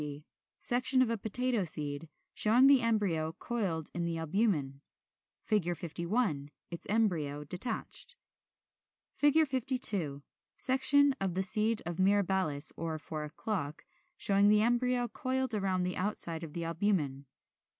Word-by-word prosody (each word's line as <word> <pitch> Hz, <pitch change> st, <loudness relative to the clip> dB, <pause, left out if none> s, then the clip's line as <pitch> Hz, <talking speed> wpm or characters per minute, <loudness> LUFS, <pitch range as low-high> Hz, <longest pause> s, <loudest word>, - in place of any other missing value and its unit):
50. 145 Hz, 0 st, -7 dB, 0.4 s
Section 255 Hz, +2 st, +2 dB
of 235 Hz, -, -2 dB
a 230 Hz, -, -1 dB
Potato 240 Hz, +1 st, 0 dB
seed, 150 Hz, -1 st, -3 dB, 0.2 s
showing 235 Hz, +5 st, +4 dB
the 275 Hz, -2 st, +6 dB
embryo 195 Hz, -9 st, 0 dB
coiled 185 Hz, -8 st, -3 dB
in 175 Hz, -, -3 dB
the 170 Hz, -1 st, -2 dB
albumen. 160 Hz, -5 st, -1 dB, 0.6 s
51. 170 Hz, -, -1 dB, 0.2 s
Its 170 Hz, -, -7 dB
embryo 165 Hz, -10 st, 0 dB
detached.] 180 Hz, -, -3 dB, 1.1 s
[Illustration: 290 Hz, -1 st, +5 dB
Fig. -, -, -12 dB
52. 220 Hz, -, +2 dB, 0.3 s
Section 275 Hz, +2 st, +4 dB
of 190 Hz, -3 st, -2 dB
the 190 Hz, -, +1 dB
seed 215 Hz, +2 st, +3 dB
of 175 Hz, 0 st, -5 dB
Mirabilis 190 Hz, -6 st, +1 dB
or 165 Hz, -1 st, -4 dB
Four 155 Hz, 0 st, -6 dB
o'clock, 155 Hz, -1 st, -5 dB, 0.3 s
showing 200 Hz, 0 st, +4 dB
the 210 Hz, 0 st, +4 dB
embryo 245 Hz, +1 st, +1 dB
coiled 260 Hz, -1 st, -2 dB
round 190 Hz, -3 st, -1 dB
the 180 Hz, -, -3 dB
outside 175 Hz, -4 st, -1 dB
of 155 Hz, -3 st, -8 dB
the 170 Hz, -, -4 dB
albumen. 165 Hz, -6 st, -2 dB
190 Hz, 130 wpm, -31 LUFS, 160-230 Hz, 1.1 s, the